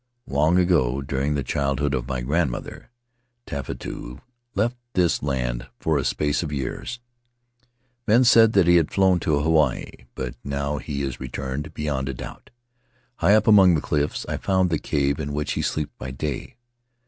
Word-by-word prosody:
Long 75 Hz, +5 st, +2 dB
ago, 70 Hz, -8 st, +2 dB
during 70 Hz, +2 st, -1 dB
the 70 Hz, -, -1 dB
childhood 70 Hz, +2 st, -1 dB
of 65 Hz, -2 st, -2 dB
my 65 Hz, -2 st, -2 dB
grandmother, 70 Hz, 0 st, -2 dB, 0.6 s
Tefatu 60 Hz, -3 st, -6 dB, 0.4 s
left 115 Hz, +5 st, +1 dB, 0.2 s
this 90 Hz, -2 st, +2 dB
land 60 Hz, -4 st, -2 dB
for 80 Hz, -3 st, +1 dB
a -, -, -1 dB
space 75 Hz, +3 st, 0 dB
of 80 Hz, -4 st, -4 dB
years; 75 Hz, -, -4 dB, 1.1 s
men 115 Hz, +4 st, +5 dB
said 115 Hz, -2 st, +6 dB
that 95 Hz, -3 st, +5 dB
he 85 Hz, 0 st, +6 dB
had 80 Hz, -3 st, +1 dB
flown 95 Hz, -2 st, +3 dB
to 75 Hz, -3 st, +1 dB
Hawaii, 75 Hz, -5 st, 0 dB
but 65 Hz, -2 st, -4 dB
now 70 Hz, +1 st, -2 dB
he 70 Hz, -1 st, -4 dB
is 65 Hz, -3 st, -4 dB
returned 65 Hz, +4 st, -5 dB
beyond 70 Hz, -3 st, -2 dB
a 70 Hz, -, -3 dB
doubt. -, -, -9 dB, 0.7 s
High 95 Hz, +5 st, +4 dB
up 110 Hz, 0 st, +3 dB
among 95 Hz, -5 st, +7 dB
the -, -, +1 dB
cliffs 75 Hz, 0 st, -1 dB
I -, -, -2 dB
found 95 Hz, -2 st, +1 dB
the 80 Hz, -, +1 dB
cave 70 Hz, 0 st, 0 dB
in 70 Hz, -1 st, -4 dB
which 75 Hz, 0 st, -2 dB
he -, -, -1 dB
sleeps 75 Hz, -2 st, -2 dB
by 65 Hz, -, -5 dB
day. 70 Hz, -, -5 dB
75 Hz, 170 wpm, -24 LUFS, 65-85 Hz, 1.1 s, among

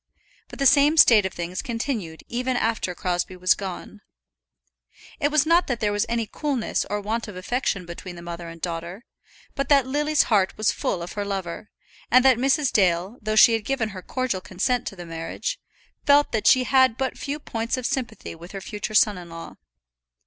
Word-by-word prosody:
But -, -, -11 dB
the 275 Hz, -, -1 dB
same 290 Hz, +3 st, +5 dB
state 215 Hz, -9 st, +7 dB
of 190 Hz, -, -10 dB
things 175 Hz, +1 st, -4 dB
continued 230 Hz, -, -4 dB
even 250 Hz, +1 st, -1 dB
after 220 Hz, -6 st, -1 dB
Crosbie 180 Hz, +1 st, -2 dB
was 185 Hz, +1 st, +4 dB
gone. 195 Hz, +2 st, -7 dB, 1.2 s
It 290 Hz, -, +2 dB
was 305 Hz, -1 st, +3 dB
not 335 Hz, +2 st, +3 dB
that 245 Hz, -3 st, -2 dB
there 210 Hz, -1 st, 0 dB
was 205 Hz, +1 st, 0 dB
any 230 Hz, -1 st, 0 dB
coolness 270 Hz, 0 st, -2 dB
or 205 Hz, -, -1 dB
want 225 Hz, +3 st, -3 dB
of 205 Hz, -, -9 dB
affection 195 Hz, -1 st, -2 dB
between 175 Hz, +1 st, -8 dB
the 170 Hz, -, -10 dB
mother 170 Hz, 0 st, -7 dB
and 165 Hz, 0 st, -11 dB
daughter, 170 Hz, +5 st, -5 dB, 0.5 s
but 275 Hz, -, -3 dB
that 280 Hz, -3 st, +5 dB
Lily's 295 Hz, +3 st, +2 dB
heart 200 Hz, -4 st, +1 dB
was 215 Hz, -, +2 dB
full 170 Hz, -, -2 dB
of 170 Hz, -, -8 dB
her 205 Hz, -, -3 dB
lover, 195 Hz, -1 st, -5 dB, 0.4 s
and 255 Hz, +1 st, +5 dB
that 260 Hz, -3 st, +5 dB
Mrs. 275 Hz, +1 st, +2 dB
Dale, 185 Hz, +2 st, +1 dB
though 215 Hz, 0 st, -2 dB
she 230 Hz, +2 st, +7 dB
had 225 Hz, -1 st, 0 dB
given 255 Hz, -4 st, -1 dB
her 190 Hz, -2 st, -8 dB
cordial 255 Hz, -4 st, -2 dB
consent 245 Hz, +8 st, -1 dB
to -, -, -5 dB
the 175 Hz, -2 st, -9 dB
marriage, 165 Hz, -, -5 dB, 0.5 s
felt 290 Hz, 0 st, +5 dB
that 220 Hz, -2 st, 0 dB
she 255 Hz, -, +6 dB
had 260 Hz, -2 st, +3 dB
but 265 Hz, -1 st, -2 dB
few 285 Hz, +1 st, -4 dB
points 230 Hz, -3 st, -3 dB
of 255 Hz, -, -5 dB
sympathy 250 Hz, -4 st, -3 dB
with 170 Hz, +3 st, -12 dB
her 195 Hz, -, -6 dB
future 210 Hz, +1 st, -5 dB
son 210 Hz, -3 st, +4 dB
in 175 Hz, -1 st, -11 dB
law. 165 Hz, 0 st, -9 dB
215 Hz, 200 wpm, -24 LUFS, 185-255 Hz, 1.2 s, state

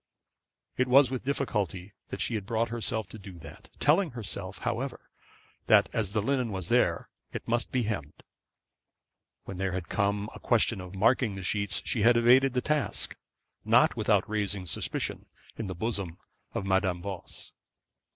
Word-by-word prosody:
It 130 Hz, -, +2 dB
was 130 Hz, 0 st, +6 dB
with 130 Hz, -1 st, -3 dB
difficulty 105 Hz, -, -2 dB, 0.2 s
that -, -, -5 dB
she -, -, -1 dB
had 105 Hz, -3 st, -3 dB
brought 115 Hz, 0 st, 0 dB
herself 110 Hz, -2 st, -2 dB
to 110 Hz, -, -9 dB
do 95 Hz, -1 st, -10 dB
that, 80 Hz, -2 st, -12 dB
telling 160 Hz, +5 st, +4 dB
herself, 100 Hz, -3 st, -4 dB
however, 120 Hz, +2 st, -4 dB, 0.6 s
that -, -, +6 dB
as 100 Hz, -4 st, -1 dB
the 105 Hz, -, +1 dB
linen 125 Hz, -2 st, 0 dB
was 95 Hz, -3 st, -4 dB
there, -, -, +2 dB, 0.3 s
it -, -, -6 dB
must 120 Hz, +1 st, 0 dB
be 125 Hz, -2 st, +1 dB
hemmed; 100 Hz, -10 st, -4 dB, 1.2 s
when 95 Hz, -, -7 dB
there 95 Hz, -1 st, -1 dB
had 90 Hz, -2 st, -4 dB
come 100 Hz, 0 st, 0 dB
a -, -, -10 dB
question 115 Hz, -4 st, +2 dB
of 90 Hz, +1 st, -9 dB
marking 115 Hz, +1 st, +3 dB
the 95 Hz, -, -6 dB
sheets, 100 Hz, +2 st, -1 dB
she 115 Hz, -, 0 dB
had 120 Hz, +3 st, +6 dB
evaded 125 Hz, +3 st, +5 dB
the 125 Hz, -, +1 dB
task, 150 Hz, +1 st, -1 dB, 0.5 s
not -, -, +4 dB
without -, -, +2 dB
raising 105 Hz, -3 st, -1 dB
suspicion 85 Hz, -, -3 dB, 0.3 s
in 110 Hz, -, -4 dB
the 95 Hz, -, -4 dB
bosom 95 Hz, -4 st, -2 dB, 0.4 s
of 95 Hz, -, -2 dB
Madame 95 Hz, -2 st, +1 dB
Voss. 95 Hz, -4 st, -7 dB
105 Hz, 165 wpm, -29 LUFS, 95-120 Hz, 1.2 s, was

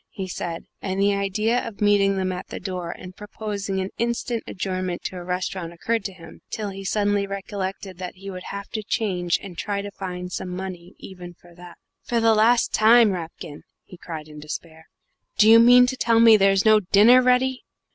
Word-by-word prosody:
he 190 Hz, -1 st, -6 dB
said, 170 Hz, -2 st, -5 dB, 0.2 s
and 190 Hz, -1 st, -3 dB
the 200 Hz, +1 st, +3 dB
idea 210 Hz, +4 st, 0 dB
of 220 Hz, -3 st, -9 dB
meeting 200 Hz, -1 st, +3 dB
them 185 Hz, -1 st, -1 dB
at 180 Hz, -, -6 dB
the -, -, -7 dB
door 180 Hz, -2 st, -5 dB
and 185 Hz, +1 st, -9 dB
proposing 205 Hz, -2 st, -5 dB
an 190 Hz, +1 st, -3 dB
instant 235 Hz, 0 st, -1 dB
adjournment 185 Hz, -2 st, -4 dB
to -, -, -5 dB
a 180 Hz, -, -7 dB
restaurant 180 Hz, -1 st, -4 dB
occurred 225 Hz, +6 st, -2 dB
to 195 Hz, -, -4 dB
him 165 Hz, -3 st, -14 dB
till 210 Hz, -2 st, -4 dB
he 195 Hz, 0 st, -8 dB
suddenly 205 Hz, 0 st, 0 dB
recollected 195 Hz, -1 st, -6 dB
that 180 Hz, -1 st, -6 dB
he 195 Hz, +1 st, -12 dB
would 185 Hz, -2 st, -7 dB
have 200 Hz, 0 st, -7 dB
to 215 Hz, -, -4 dB
change 185 Hz, -6 st, -1 dB
and 185 Hz, -4 st, -9 dB
try 205 Hz, -1 st, -2 dB
to 200 Hz, 0 st, -6 dB
find 180 Hz, -2 st, -6 dB
some 180 Hz, -, -5 dB
money, 180 Hz, -1 st, -7 dB
even 180 Hz, -2 st, -11 dB
for 175 Hz, -1 st, -19 dB
that. 175 Hz, 0 st, -13 dB, 0.2 s
"For 235 Hz, -, -1 dB
the 225 Hz, 0 st, +4 dB
last 230 Hz, +3 st, +3 dB
time, 225 Hz, 0 st, +6 dB
Rapkin," 165 Hz, -4 st, -7 dB, 0.2 s
he -, -, -14 dB
cried 160 Hz, -3 st, -8 dB
in 150 Hz, -1 st, -11 dB
despair, 160 Hz, +1 st, -8 dB, 0.5 s
"do 215 Hz, -, +5 dB
you 225 Hz, +1 st, +8 dB
mean 245 Hz, +1 st, +7 dB
to 255 Hz, +1 st, -2 dB
tell 230 Hz, -2 st, +2 dB
me 230 Hz, -1 st, +8 dB
there's 195 Hz, -1 st, +3 dB
no 215 Hz, 0 st, +6 dB
dinner 210 Hz, +6 st, +5 dB
ready?" 255 Hz, +1 st, +2 dB
195 Hz, 200 wpm, -23 LUFS, 180-215 Hz, 0.5 s, you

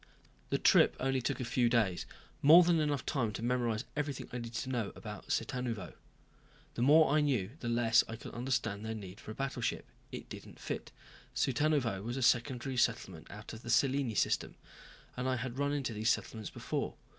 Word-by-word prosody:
The -, -, +1 dB
trip -, -, +5 dB
took -, -, -12 dB
only 135 Hz, 0 st, +1 dB
a 125 Hz, -, -1 dB
few 120 Hz, 0 st, +2 dB
days, 110 Hz, -7 st, +1 dB, 0.3 s
more 165 Hz, +5 st, +9 dB
than 170 Hz, -1 st, +3 dB
enough 145 Hz, -3 st, 0 dB
time 120 Hz, -7 st, 0 dB
to 110 Hz, -, -5 dB
memorize 120 Hz, -2 st, 0 dB
everything 145 Hz, -3 st, -3 dB
I -, -, -2 dB
needed 115 Hz, 0 st, -7 dB
to 130 Hz, -, -3 dB
know 120 Hz, -5 st, -1 dB
about 105 Hz, -2 st, -8 dB
Cittanuvo. 115 Hz, -5 st, -2 dB
And -, -, -18 dB, 0.8 s
the -, -, -4 dB
more 150 Hz, +3 st, +6 dB
I 155 Hz, -, +4 dB
knew 125 Hz, -9 st, 0 dB
the 120 Hz, -, -3 dB
less 115 Hz, -1 st, +4 dB
I 115 Hz, -, -4 dB
could 115 Hz, -, -10 dB
understand 120 Hz, -4 st, -1 dB
their 110 Hz, 0 st, -3 dB
need 100 Hz, -2 st, -9 dB
for -, -, -11 dB
a 110 Hz, -, -6 dB
battleship. 130 Hz, -3 st, -2 dB, 0.3 s
It -, -, -7 dB
didn't -, -, -10 dB
fit. -, -, -5 dB, 0.4 s
Cittanuvo 135 Hz, -7 st, +1 dB
was 120 Hz, +5 st, -4 dB
a 135 Hz, -, -1 dB
secondary 125 Hz, +1 st, +1 dB
settlement 95 Hz, -9 st, 0 dB
out 105 Hz, +2 st, -9 dB
of 110 Hz, -, -9 dB
the 120 Hz, -, -8 dB
Cellini 130 Hz, 0 st, +2 dB
system, -, -, 0 dB, 0.6 s
and 125 Hz, +1 st, -1 dB
I 130 Hz, -, +1 dB
had 125 Hz, +1 st, -4 dB
run 140 Hz, 0 st, +1 dB
into 140 Hz, -5 st, -2 dB
these 110 Hz, +2 st, 0 dB
settlements 110 Hz, -2 st, -1 dB
before. -, -, -3 dB
120 Hz, 195 wpm, -33 LUFS, 115-135 Hz, 0.8 s, more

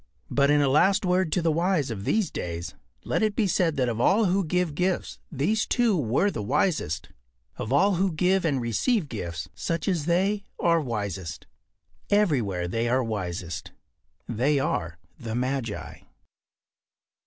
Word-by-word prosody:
But 140 Hz, 0 st, +3 dB
in 145 Hz, 0 st, +4 dB
a -, -, +3 dB
last 190 Hz, +9 st, +3 dB
word 180 Hz, -2 st, +2 dB
to 180 Hz, -, +1 dB
the 165 Hz, -, +3 dB
wise 165 Hz, -4 st, +1 dB
of 100 Hz, -2 st, -5 dB
these 215 Hz, -4 st, +1 dB
days 85 Hz, 0 st, -5 dB, 0.3 s
let -, -, 0 dB
it 215 Hz, -2 st, +1 dB
be 220 Hz, -, +2 dB
said 170 Hz, -4 st, +1 dB
that 130 Hz, -2 st, +2 dB
of 115 Hz, -1 st, -1 dB
all 210 Hz, -, +4 dB
who 190 Hz, +1 st, +2 dB
give 180 Hz, -1 st, 0 dB
gifts 180 Hz, +4 st, -1 dB
these 175 Hz, +10 st, 0 dB
two 240 Hz, -4 st, +2 dB
were 150 Hz, -, +1 dB
the 110 Hz, -, -4 dB
wisest. 110 Hz, -, 0 dB, 0.5 s
Of 110 Hz, -, -4 dB
all 190 Hz, +7 st, +4 dB
who 190 Hz, +1 st, +2 dB
give 180 Hz, +4 st, +2 dB
and 145 Hz, -5 st, +1 dB
receive 150 Hz, -, 0 dB
gifts, 85 Hz, -9 st, -5 dB
such 165 Hz, 0 st, -3 dB
as 170 Hz, -6 st, 0 dB
they 195 Hz, +4 st, +1 dB, 0.2 s
are 170 Hz, -1 st, +3 dB
wisest. 100 Hz, -, -4 dB, 0.6 s
Everywhere 125 Hz, -, +1 dB
they 115 Hz, +6 st, -1 dB
are 130 Hz, +1 st, +2 dB
wisest. 90 Hz, -6 st, -4 dB, 0.5 s
They 130 Hz, +6 st, +1 dB
are 85 Hz, -11 st, -1 dB, 0.2 s
the 115 Hz, -2 st, -5 dB
magi. 125 Hz, -3 st, -3 dB
145 Hz, 160 wpm, -26 LUFS, 115-185 Hz, 0.6 s, in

